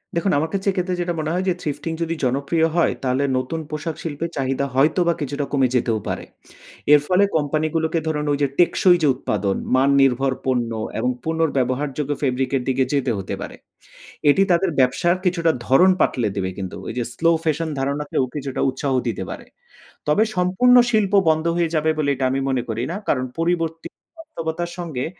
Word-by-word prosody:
দেখুন, 190 +3 +1
আমার 160 +2 0
কাছে 195 0 -2
এক্ষেত্রে 180 0 -2
যেটা 175 0 -1
মনে 155 0 -2
হয় 185 +2 0
যে - - +2
thrifting 160 +2 -3
যদি 165 0 -2
জনপ্রিয় 140 +6 +1
হয়, 170 - +3
তাহলে 130 +1 +1
নতুন 130 +6 -3
পোশাক 155 +1 -4
শিল্পের 165 +1 -3
চাহিদা 135 0 0
হয়তোবা 170 +5 +3
কিছুটা 145 0 -2
কমে 135 -3 +3
যেতেও 115 -3 +1
পারে। - - -3 0.7
এর 150 - +8
ফলে 185 +2 +4
কোম্পানিগুলোকে 155 +2 0
ধরুন 150 -1 -1
ওইযে 145 0 +1
টেকসই 175 +1 +5
যে - - +5
উৎপাদন, 100 -6 -1 0.2
মান 135 +2 +3
নির্ভর 135 0 +2
পণ্য 125 -3 0 0.3
এবং 125 +3 +1
পুনর্ব্যবহারযোগ্য 145 -3 -1
ফেব্রিকের 130 -1 0
দিকে 130 0 +2
যেতে 135 -3 +1
হতে 95 - -4
পারে। - - -7 0.7
এটি 145 - +4
তাদের 175 +2 +3
ব্যবসার 135 +8 +2
কিছুটা 170 -2 +2 0.2
ধরন 180 +9 +6
পাল্টে 120 -4 +1
দেবে 95 -2 -1
কিন্তু। 95 -2 -5
ওইযে 120 +1 -2
slow 165 +6 +2
fashion 160 0 0
ধারণাকেও 140 0 -1
কিছুটা 140 -2 -3
উৎসাহ 135 +1 -2
দিতে 105 -5 -2
পারে। - - -7 0.6
তবে 150 +9 +4
সম্পূর্ণ 185 +8 +4 0.2
শিল্প 210 -3 +1 0.2
বন্ধ 160 +1 +1
হয়ে 170 -1 +1
যাবে 155 0 +2
বলে 150 -2 0
এটা 130 0 -1
আমি 135 - 0
মনে 130 -2 +1
করি 115 +1 -2
না। 180 - -3
কারণ, 130 -2 +1
পরিবর্তী 165 -1 -1 0.3
বাস্তবতার 175 - -5
সঙ্গে 160 -8 -4
150 Hz, 170 wpm, -21 LUFS, 130-170 Hz, 0.7 s, এর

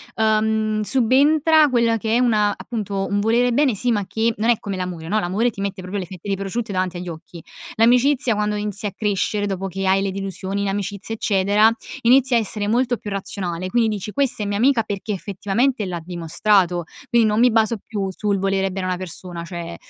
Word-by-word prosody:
ehm, 215 0 +1
subentra 290 +6 +4
quella 235 -2 +2
che 220 +1 -1
è - - +2
un 245 -3 +3
appunto, 205 -1 -1
un 205 0 0
volere 240 +3 +2
bene, 280 -2 +3
sì, 245 +4 0
ma 205 -2 -1
che 225 +3 0
non 225 +3 0
è 235 - +3
come 200 -2 -5
l'amore, 175 -3 -5
no? 215 +4 +1
L'amore 205 +6 0
ti 200 - -8
mette 195 -1 -3
proprio 190 +2 -4
le 180 - -4
fette 185 +2 -11
di 195 - +1
prosciutto 200 +3 -4
davanti 185 -1 -1
agli 180 0 -7
occhi, 165 0 -9 0.3
l'amicizia 245 +1 +3
quando 210 0 -1
inizi 210 0 -2
a 200 - -1
crescere, 205 0 -1
dopo 195 0 -3
che 195 +1 -3
hai 195 +1 +3
le 195 - -1
delusioni 195 0 -4
in - - -1
amicizia, 200 +2 -3
eccetera, 205 +2 +3 0.3
inizia 255 +1 +4
a - - +4
essere 205 0 -2
molto 245 +1 +1
più 205 - -7
razionale, 185 -2 -4
quindi 230 +1 +2
dici: 205 +1 -6
"Questa 270 -5 0
è - - -3
mia 200 0 -1
amica 245 -1 +3
perché 205 +1 -4
effettivamente 205 +5 -1
l'ha 175 -2 -4
dimostrato!", 175 +1 +1 0.3
quindi 235 -2 +4
non 210 +1 +1
mi 250 +1 +6
baso 220 0 +2
più 200 -3 -3
sul 200 +1 -1
volere 195 0 0
bene 190 0 -4
a - - -1
una 180 - -1
persona 175 -1 -6
cioè 170 -1 -6
205 Hz, 210 wpm, -21 LUFS, 190-230 Hz, 0.3 s, mi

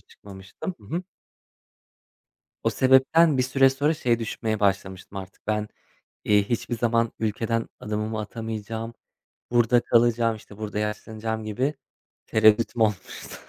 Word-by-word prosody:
çıkmamıştım. 100 - -9
Hı - - -16
hı. 180 - -2 1.6
O - - +2
sebepten 135 +4 +4
bir 130 - +4
süre 135 +1 +4
sonra 145 +4 +1
şey 120 -6 +1
düşünmeye 110 -1 -3
başlamıştım 95 -1 -1
artık. 95 0 -11
Ben, 105 0 -1 0.6
eee, 105 -1 +4
hiçbir 120 +1 -1
zaman 115 -1 +1
ülkeden 115 +1 -1
adımımı 105 +1 -3
atamayacağım. 110 +1 -5 0.6
Burada 120 0 +4
kalacağım. 115 -1 +3
İşte 105 -1 -14
burada 105 -1 -4
yaşlanacağım 110 +1 -3
gibi 125 +8 -1 0.5
tereddüdüm 110 +2 +3
olmuştu. 105 -4 -1
110 Hz, 120 wpm, -25 LUFS, 105-120 Hz, 1.6 s, sebepten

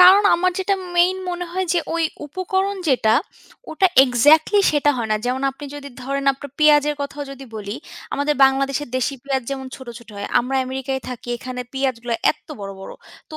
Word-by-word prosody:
কারণ, 375 +3 +9
আমার 365 +1 +2
যেটা 390 +1 +1 0.2
মেইন 360 +2 +4
মনে 355 0 -3
হয় 375 +1 -1
যে, 350 - +2 0.2
ওই 335 - +1 0.2
উপকরণ 380 +5 -1
যেটা, 230 -5 +3 0.6
ওটা 380 +4 +3 0.2
এক্সাক্টলি 295 - +4
সেটা 290 0 +3
হয় 225 -2 -2
না। - - +3
যেমন 255 +2 -1
আপনি 270 +2 -11
যদি 285 -1 -7
ধরেন, 275 +2 -2
আপনার 280 +1 -10
পিঁয়াজের 295 -1 +5
কথাও 285 +1 -5
যদি 275 0 -9
বলি, 205 0 -5 0.4
আমাদের 285 +1 +1
বাংলাদেশের 275 +1 +1
দেশি 255 +2 0
পিঁয়াজ 270 -1 -1
যেমন 265 -1 -4
ছোট, 260 -2 -12
ছোট 235 -1 -18
হয়। 200 - -4
আমরা 265 +2 -2
আমেরিকায় 265 +1 -3
থাকি, 245 -1 -8
এখানে 250 0 -6
পিঁয়াজগুলো 250 -3 -1 0.2
এত্ত - - -10
বড়, 195 0 -5
বড়। 195 - -8 0.4
তো 310 - -6
275 Hz, 185 wpm, -21 LUFS, 255-315 Hz, 0.6 s, কারণ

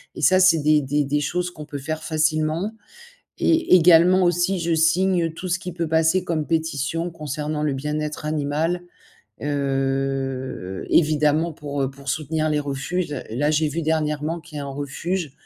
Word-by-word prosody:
et - - -7
ça, 185 0 +5
c'est 175 -3 +5
des 150 0 +3
des 145 +2 0
des 145 +2 0
choses 180 +5 -1
qu'on 155 -3 -9
peut 145 -1 -6
faire 155 +3 -4
facilement 155 +4 0 0.7
et 325 - +3
également 175 +1 +6
aussi, 175 +2 +1
je 170 -1 0
signe 170 +1 +2
tout 180 +3 -6
ce 175 - +1
qui 180 -2 -6
peut 170 -2 -2
passer 160 +3 +2
comme 160 -4 -2
pétition 160 +1 -1
concernant 150 -1 -4
le 150 -2 +1
bien-être 150 +2 -3
animal, 155 +3 -1 0.6
heu, 135 -6 -2
évidemment 155 +1 +3
pour, 145 -2 -5
heu, 135 - 0
pour 140 0 -13
soutenir 155 +1 -1
les 150 - +1
refuges. 145 +4 -3 0.2
Là, 140 +7 0
j'ai 155 0 +2
vu 165 +3 -3
dernièrement 155 +1 -1
qu'il 160 -2 -12
y - - -3
a - - -4
un - - -6
refuge, 145 +4 -3
155 Hz, 170 wpm, -23 LUFS, 145-170 Hz, 0.7 s, également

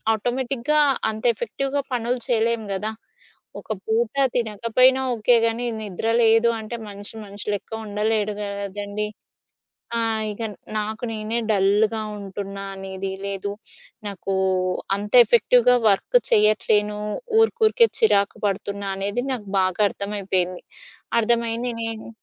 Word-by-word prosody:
ఆటోమేటిక్‌గా 260 +5 0 0.3
అంత 220 0 -5
ఎఫెక్టివ్‌గా 275 +6 -2
పనులు 245 +1 -1
చేయలేము 230 -2 +1
గదా! 215 +3 -2 0.7
ఒక 215 - -4
పూట 225 +2 0 0.2
తినకపోయినా 235 +3 +3
ఓకే 235 +2 +3
గానీ 230 +2 -1 0.2
నిద్ర 205 +1 -4
లేదు 225 +1 +5
అంటే 220 +2 -6
మనిషి, 205 +2 -9
మనిషి 200 0 -9
లెక్క 205 - -5
ఉండలేడు 210 0 0
గదండీ. 205 +1 -4 0.9
ఆ! - - +1 0.3
ఇగ 210 +2 -6 0.4
నాకు 215 +3 -3
నేనే 220 +2 -2
డల్‌గా 210 +2 +2 0.2
ఉంటున్నా 200 0 -6
అనేది 190 0 -5
లేదు. 200 0 -3 0.6
నాకు 195 0 -4 0.6
అంత 205 +1 -6
ఎఫెక్టివ్‌గా 245 +2 +4
వర్క్ - - +3
చేయట్లేను. 210 0 +3 0.4
ఊరికూరికే 450 +1 +4
చిరాకు 200 - +3
పడుతున్నా 200 0 -3
అనేది 205 +5 -2
నాకు 210 -6 -5
బాగా 185 +2 +1
అర్థమైపోయింది. 190 -3 -2 0.6
అర్థమైంది 235 +1 0
నేను... 225 -1 -5
215 Hz, 110 wpm, -23 LUFS, 200-235 Hz, 0.9 s, లేదు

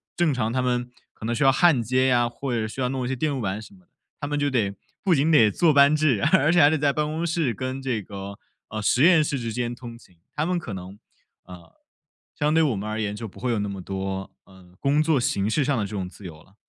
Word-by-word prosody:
正 170 -3 +2
常 115 -3 -1
他 130 - +1
们 125 -1 -1 0.2
可 110 - -9
能 120 - -1
需 130 - 0
要 135 - +6
焊 150 -3 +4
接 130 +3 +1
呀， 120 -2 +2
或 130 +1 -5
者 110 -2 -1
需 130 +5 -6
要 125 - 0
弄 130 -2 -3
一 - - -2
些 130 - -2
电 155 +3 -1
路 135 -3 -3
板 95 0 -2
什 110 - -12
么 190 - -18
的。 175 - -31 0.3
他 145 - -2
们 145 0 -2
就 145 0 +1
得 105 -6 0 0.3
不 185 -5 +3
仅 150 +4 +2
得 115 -8 +6
坐 160 - +3
班 140 +2 +6
制， 140 -10 +2
而 150 +4 +5
且 175 - +4
还 145 - +7
得 160 - +1
在 145 0 +2
办 150 +1 -1
公 160 +3 -3
室 160 -7 0
跟 130 +3 -4
这 125 -5 -2
个， 100 +1 -8 0.3
呃， 110 0 -5
实 125 +6 +2
验 165 -3 +6
室 140 -3 -2
之 115 -2 -4
间 120 0 -2
通 120 -1 -10
勤。 90 -7 -22 0.2
他 150 +1 0
们 180 0 0
可 120 -11 -7
能， 95 +2 -9 0.5
呃， 90 -2 -14 0.6
相 150 +1 +1
对 160 - +4
我 140 -8 +1
们 105 +2 -4
而 110 +1 -3
言 105 -1 -2
就 115 -1 -7
不 - - -15
会 125 - -2
有 115 -3 0
那 100 0 -2
么 95 -1 -6
多 95 0 -4
呃， 90 -1 -19
工 145 +2 +2
作 155 -2 +2
形 105 -6 0
式 140 +6 +1
上 135 -2 0
的 105 - -1
这 100 - -8
种 95 -3 -4
自 100 - -14
由 80 -2 -10
了。 100 - -26
125 Hz, 300 characters per minute, -24 LUFS, 105-145 Hz, 0.6 s, 还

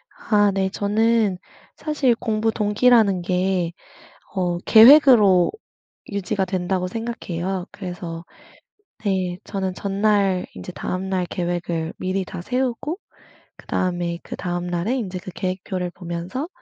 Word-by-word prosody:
아 205 -2 +2
네 190 -1 0
저는 210 0 +1 0.4
사실 285 -6 +1
공부 220 -1 0
동기라는 210 -2 +3
게 180 -1 0 0.6
어 180 -3 0
계획으로 220 - +7 0.6
유지가 200 -1 -1
된다고 185 0 -1
생각해요. 190 -4 -4
그래서 175 -3 -7 0.8
네 185 -3 0
저는 190 -2 -3
전날 200 -1 +1
인제 180 - -8
다음날 185 0 -2
계획을 175 -2 -2
미리 185 0 -2
다 175 - -7
세우고 255 - -2 0.6
그다음에 175 -2 -2
그다음 175 0 -4
날에 175 +9 -1
인제 190 -7 -3
그 185 - -8
계획표를 185 -1 -3
보면서 175 - -5
190 Hz, 250 characters per minute, -22 LUFS, 180-215 Hz, 0.8 s, 계획으로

